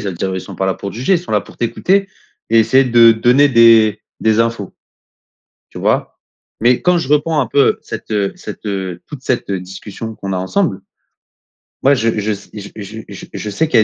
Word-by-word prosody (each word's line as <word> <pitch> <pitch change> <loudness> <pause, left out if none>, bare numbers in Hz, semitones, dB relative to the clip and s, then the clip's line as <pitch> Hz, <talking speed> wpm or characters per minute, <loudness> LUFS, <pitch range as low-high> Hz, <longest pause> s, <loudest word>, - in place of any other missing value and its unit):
ça 100 - -4
veut 90 - -5
dire, 95 +2 -2
eux, - - -3
ils - - -3
sont 95 - -10
pas 95 - -1
là 95 - 0
pour 100 - -6
te - - -10
juger, 130 +11 0
ils 175 - +3
sont 175 -10 -8
là 105 - +3
pour - - -15
t'écouter 190 - 0 0.4
et 115 - +5
essayer 130 +5 +4
de 115 -2 +6
donner 125 +6 +4
des 115 -4 +5 0.2
des 110 0 +2
infos. 115 -4 -2 1.0
Tu - - -9
vois? - - -1 0.4
Mais 120 +2 +3
quand 180 -1 +3
je 135 - -4
reprends 150 +1 +2
un 125 - 0
peu 140 +4 +2
cette - - -8
heu 100 -2 0
cette - - -9
heu, 95 -3 -4
toute 145 -4 -10
cette, 125 -5 -1
heu, 95 -2 -1
discussion 100 +4 -8
qu'on 100 -2 -6
a - - -1
ensemble, 95 - -1 1.0
moi 140 +1 +5
je 115 -3 0
je 105 +1 -1
s 100 -1 -7 0.3
je 110 +1 -8
je - - -9
je 105 - -5
sais 155 +11 0
qu'il 125 - +2
y - - +5
115 Hz, 225 wpm, -16 LUFS, 100-130 Hz, 1.0 s, de